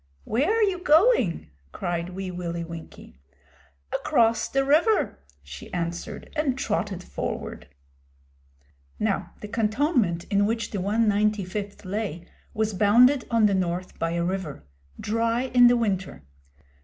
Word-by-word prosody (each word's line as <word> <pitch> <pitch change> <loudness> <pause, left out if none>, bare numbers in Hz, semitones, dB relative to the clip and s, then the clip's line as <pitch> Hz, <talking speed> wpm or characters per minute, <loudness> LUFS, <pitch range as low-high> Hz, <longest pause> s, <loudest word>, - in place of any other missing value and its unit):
'Where 265 - 0
are 450 +1 +3
you 385 -3 +1
going?' 310 - +3 0.2
cried 175 0 -3
Wee 185 0 -5
Willie 170 -1 -4
Winkie. 165 - -11 0.7
'Across 230 -1 +2
the 270 0 +1
river,' 325 - +2 0.2
she 70 -1 -10
answered, 170 -1 -4
and 290 -4 0
trotted 205 -6 -2
forward. - - -5 1.3
Now - - -1
the 210 - -6
cantonment 215 - +1
in 200 0 +3
which 225 +1 -2
the 200 - -3
195th 205 -1 0
lay 185 -4 -4 0.3
was 220 -1 -1
bounded 240 +7 +5
on 230 -2 +3
the 205 - +3
north 180 -1 -2
by 165 0 -1
a 170 0 0
river 185 -5 -4 0.4
dry 230 +2 0
in 245 -1 +8
the 245 0 +4
winter. 195 - -2
210 Hz, 130 wpm, -25 LUFS, 180-240 Hz, 1.3 s, in